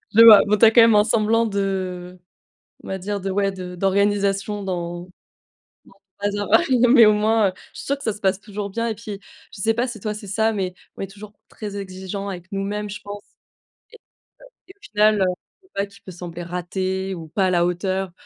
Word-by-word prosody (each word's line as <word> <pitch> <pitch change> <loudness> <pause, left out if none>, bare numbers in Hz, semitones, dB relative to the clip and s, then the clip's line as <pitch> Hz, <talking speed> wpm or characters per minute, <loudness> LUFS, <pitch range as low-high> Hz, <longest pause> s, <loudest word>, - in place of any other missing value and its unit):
Je 225 - +8
vois. 220 -3 +10
Bon, 210 +1 +2
tu 215 - +6
as 220 - +7
quand 235 - +7
même 230 -1 +6
un 210 - +6
semblant 225 +1 +2
de 185 -3 -3 0.6
on - - -11
va 190 - -3
dire, 200 +2 -4
de, 195 +1 -3
ouais, 200 +1 +1
de 180 -1 -8
d'organisation 200 +1 0
dans 175 -2 -4
dans - - -12
ton - - -19 1.1
bazar. 205 0 -1
Ouais, 295 -7 +4
non 245 +1 +4
mais 240 -3 +8
au 210 - +6
moins, 215 0 +2
heu, - - -15 0.2
je - - -13
suis - - -8
sûre 280 0 -1
que 280 - -11
ça 220 - 0
se 205 - -12
passe 190 -1 +1
toujours 205 -1 -6
bien 230 +4 -2
et 225 - -2
puis, 210 -2 -8 0.3
je - - -10
sais 225 +2 +2
pas 240 +2 0
si 240 -4 -7
toi, 210 +2 -3
c'est 210 0 -9
ça, 220 +3 +1
mais 190 -4 -3 0.2
on - - -6
est - - -2
toujours 205 +1 -12 0.2
très 205 -2 -7
exigeants 195 +1 -6
avec 185 -1 -8
nous-mêmes, 205 +1 -3
je 210 - -7
pense 205 0 -8 0.7
et - - -15
heu - - -64 0.7
et - - -12
au - - -40
final, 210 0 +2
heu, - - +4 0.4
je - - -25
sais 375 - -36
pas, 200 - -1
tout 200 - -18
peut 185 - -9
sembler 175 0 -8
rater 185 +2 -3
ou 165 -3 -9
pas 190 +4 0
à - - +1
la 175 -1 +2
hauteur. 185 +1 -2
200 Hz, 240 wpm, -22 LUFS, 190-215 Hz, 1.1 s, vois